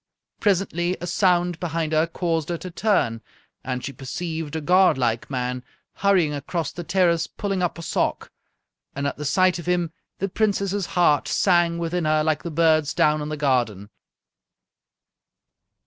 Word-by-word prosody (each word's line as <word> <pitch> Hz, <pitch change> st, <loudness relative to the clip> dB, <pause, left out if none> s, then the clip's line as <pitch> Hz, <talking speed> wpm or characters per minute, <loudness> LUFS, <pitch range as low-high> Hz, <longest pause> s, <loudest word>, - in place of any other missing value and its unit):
Presently 185 Hz, -3 st, 0 dB
a 175 Hz, -, -5 dB
sound 175 Hz, -2 st, +1 dB
behind 165 Hz, -2 st, -2 dB
her 155 Hz, +1 st, +3 dB
caused 165 Hz, -2 st, -2 dB
her 170 Hz, -, -1 dB
to 180 Hz, +2 st, -8 dB
turn, 165 Hz, -, +1 dB, 0.4 s
and 125 Hz, -1 st, -3 dB
she 140 Hz, -, -5 dB
perceived 160 Hz, +4 st, -5 dB
a -, -, -1 dB
godlike 145 Hz, -9 st, +2 dB
man 125 Hz, -1 st, -3 dB, 0.3 s
hurrying 185 Hz, -6 st, +2 dB
across 145 Hz, +2 st, -3 dB
the 175 Hz, -, -7 dB
terrace 175 Hz, -2 st, +2 dB
pulling 195 Hz, -2 st, -3 dB
up 175 Hz, -1 st, -1 dB
a 170 Hz, -, -7 dB
sock. -, -, -1 dB, 0.6 s
And 140 Hz, +1 st, -3 dB
at -, -, -2 dB
the 150 Hz, -, -5 dB
sight 185 Hz, +4 st, +3 dB
of 170 Hz, -, -9 dB
him 175 Hz, -2 st, 0 dB, 0.3 s
the 195 Hz, -, -1 dB
Princess's 200 Hz, -1 st, 0 dB
heart 150 Hz, -5 st, +4 dB
sang 175 Hz, -3 st, +2 dB
within 170 Hz, 0 st, -2 dB
her 155 Hz, 0 st, +2 dB
like 155 Hz, -1 st, 0 dB
the 170 Hz, -, -5 dB
birds 155 Hz, -2 st, +2 dB
down 150 Hz, 0 st, +3 dB
in 150 Hz, -, -4 dB
the 155 Hz, -, -4 dB
garden. 120 Hz, -8 st, 0 dB
165 Hz, 160 wpm, -23 LUFS, 150-180 Hz, 0.6 s, heart